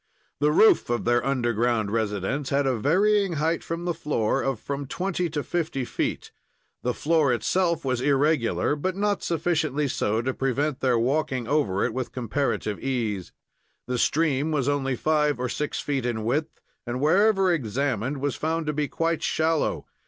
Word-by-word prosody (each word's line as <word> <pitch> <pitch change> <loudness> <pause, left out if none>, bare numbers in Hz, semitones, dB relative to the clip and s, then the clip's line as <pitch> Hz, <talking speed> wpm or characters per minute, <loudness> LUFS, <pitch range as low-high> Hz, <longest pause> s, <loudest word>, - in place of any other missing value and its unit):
The 150 +1 +3
roof 215 - +5
of 120 0 -1
their 120 +1 +2
underground 120 -4 0
residence 110 +5 -1
had 140 0 +1
a 130 -2 +2
varying 195 - +2
height 160 +2 0
from 170 +1 -4
the 175 - 0
floor 135 -5 0
of 135 -4 -1
from 140 +2 -4
twenty 180 +2 -2
to 150 -2 -3
fifty 155 -7 -2
feet. - - -3 0.5
The 125 0 -1
floor 155 -3 +2
itself 170 - 0
was 130 -2 0
regular, 145 -1 +2
but 185 +5 -2
not 205 0 0
sufficiently 155 -3 0
so 110 -3 0
to 130 +1 -1
prevent 135 +2 -1
their 125 -3 +2
walking 130 0 0
over 140 -10 +1
it - - -2
with 130 -1 -3
comparative 120 -3 -2
ease. 115 -8 -2 0.5
The 125 -1 -2
stream 150 +1 +1
was 140 -4 0
only 135 -2 0
five 150 +2 +1
or 125 0 -1
six 150 +4 -3
feet 135 -4 -1
in 110 -3 -2
width 145 +8 -1 0.3
and 120 +1 -2
wherever 195 +5 +4
examined 130 -1 -1
was 145 -2 -1
found 160 +1 -1
to 150 - -1
be 150 0 -1
quite 165 +1 -1
shallow. 160 0 0
140 Hz, 165 wpm, -25 LUFS, 125-160 Hz, 0.5 s, roof